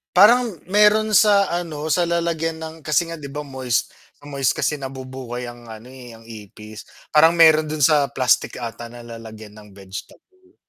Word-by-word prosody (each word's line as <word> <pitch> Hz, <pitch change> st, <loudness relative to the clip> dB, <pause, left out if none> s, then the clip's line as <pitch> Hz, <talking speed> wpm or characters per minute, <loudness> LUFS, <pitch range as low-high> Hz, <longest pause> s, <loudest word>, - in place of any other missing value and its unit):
parang 225 Hz, +3 st, +5 dB, 0.2 s
meron 210 Hz, +1 st, +4 dB
sa 200 Hz, -1 st, +4 dB
ano, 160 Hz, -3 st, -4 dB
sa 175 Hz, +1 st, +1 dB
lalagyan 165 Hz, -1 st, -2 dB
ng 160 Hz, 0 st, -7 dB
kasi 155 Hz, +2 st, +1 dB
nga 165 Hz, -1 st, -7 dB
di 140 Hz, -, -8 dB
ba 145 Hz, +2 st, -6 dB
moist 130 Hz, -4 st, -2 dB, 0.2 s
sa -, -, -29 dB
moist 135 Hz, -3 st, 0 dB
kasi 150 Hz, -, -1 dB
nabubuhay 130 Hz, -2 st, -7 dB
ang 120 Hz, 0 st, -12 dB
ano, 110 Hz, +1 st, -11 dB
eh, 125 Hz, -3 st, -12 dB
ang 115 Hz, -, -17 dB
ipis. 110 Hz, -1 st, -12 dB, 0.2 s
Parang 160 Hz, +2 st, +5 dB
meron 160 Hz, -2 st, +5 dB
dun 150 Hz, -1 st, -2 dB
sa 145 Hz, 0 st, +4 dB
plastic 130 Hz, -3 st, +1 dB
ata 120 Hz, 0 st, -7 dB
na 120 Hz, 0 st, -12 dB
lalagyan 110 Hz, -2 st, -11 dB
ng 105 Hz, 0 st, -16 dB
vegetable. 355 Hz, -, -13 dB
145 Hz, 175 wpm, -21 LUFS, 120-170 Hz, 0.2 s, parang